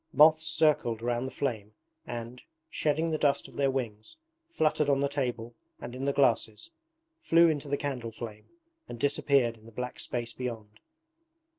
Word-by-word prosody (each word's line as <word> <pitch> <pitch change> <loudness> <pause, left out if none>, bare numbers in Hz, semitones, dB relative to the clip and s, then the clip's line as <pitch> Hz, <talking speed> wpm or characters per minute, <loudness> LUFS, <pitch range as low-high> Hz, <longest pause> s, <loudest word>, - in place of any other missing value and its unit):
Moths 155 +1 +6
circled 150 -8 +2
round 120 +1 -1
the - - -6
flame 110 -6 -3 0.3
and, 120 +1 -6 0.3
shedding 160 +2 0
the 155 - -1
dust 145 -2 +2
of - - -16
their 140 -1 +2
wings, 115 - -4 0.3
fluttered 155 - +1
on 140 -1 +3
the 140 - +2
table 125 -4 -3 0.3
and 120 - -7
in 130 +2 -4
the 140 - +2
glasses, 120 - +1 0.5
flew 170 - +5
into 150 -2 -2
the 140 - +1
candle 130 -6 -4
flame, 110 -2 -9 0.4
and 120 - -7
disappeared 140 -4 +2
in 110 - -17
the - - -12
black 125 +2 -5
space 120 -1 -3
beyond. 115 -4 -6
130 Hz, 165 wpm, -29 LUFS, 115-145 Hz, 0.5 s, Moths